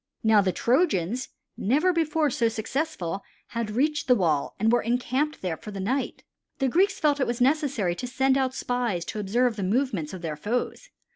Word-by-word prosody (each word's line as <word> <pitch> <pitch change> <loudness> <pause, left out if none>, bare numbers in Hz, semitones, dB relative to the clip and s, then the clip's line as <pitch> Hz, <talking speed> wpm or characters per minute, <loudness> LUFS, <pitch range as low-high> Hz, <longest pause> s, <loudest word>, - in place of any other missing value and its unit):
Now 220 -2 +5
the 190 -1 +1
Trojans, 235 - +1 0.3
never 300 - +2
before 315 -3 +1
so 230 -1 +2
successful, 220 - -3 0.3
had 230 -2 -3
reached 290 +7 0
the 250 - +6
wall 160 -9 0
and 220 +2 +3
were 240 - +3
encamped 255 +5 -1
there 175 -4 -2
for 210 - -10
the 200 -2 -6
night. 255 +8 -2 0.3
The 270 - +1
Greeks 385 +7 +2
felt 295 -2 +3
that 265 - +2
it - - -7
was 240 0 -2
necessary 260 - +2
to 250 - -4
send 265 +1 +2
out 260 -1 0
spies 240 -9 -1
to 215 - -5
observe 225 +3 +1
the 200 - -2
movements 200 - 0
of 185 -2 -8
their 155 -2 -3
foes. 240 - -3
245 Hz, 195 wpm, -26 LUFS, 200-275 Hz, 0.3 s, the